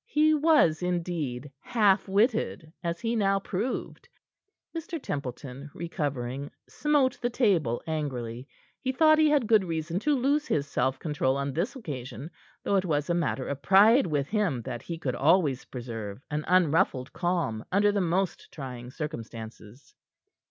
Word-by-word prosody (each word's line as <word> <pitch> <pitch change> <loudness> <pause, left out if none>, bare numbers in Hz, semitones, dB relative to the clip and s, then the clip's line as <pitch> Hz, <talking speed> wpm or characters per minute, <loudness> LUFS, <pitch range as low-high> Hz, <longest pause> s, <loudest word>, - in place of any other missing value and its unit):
He 310 +1 +3
was, 295 - +4
indeed, 165 -7 -2
half 210 -4 +2
witted, 200 -6 +1
as 170 0 -2
he 230 +1 0
now 195 -2 +2
proved. 200 +6 -4 0.7
Mr. 330 0 -4
Templeton, 140 - -6
recovering, 140 -5 -3 0.2
smote 290 -4 +1
the 240 - +1
table 180 - +1
angrily. 130 -6 -4 0.3
He 260 - 0
thought 310 +2 +5
he 310 -1 +5
had 290 -5 +3
good 215 -2 +4
reason 165 0 -2
to 295 +6 +2
lose 285 +4 +1
his 145 - 0
self 130 -2 0
control 140 -4 0
on 140 0 -2
this 190 - -1
occasion, 145 - -7 0.3
though 200 - +2
it 190 - +1
was 150 -1 0
a - - +3
matter 150 -6 -1
of 140 -1 -4
pride 210 +5 +6
with 145 -3 0
him 200 - 0
that 120 -1 -5
he 170 - -6
could 135 -6 -2
always 145 -1 +2
preserve 115 -4 -6
an 150 +1 -2
unruffled 165 -6 +2
calm 170 -11 -1
under 205 +2 +4
the 205 -1 0
most 180 +2 -1
trying 125 -4 -7
circumstances. 115 -5 -8
165 Hz, 150 wpm, -28 LUFS, 135-205 Hz, 0.7 s, pride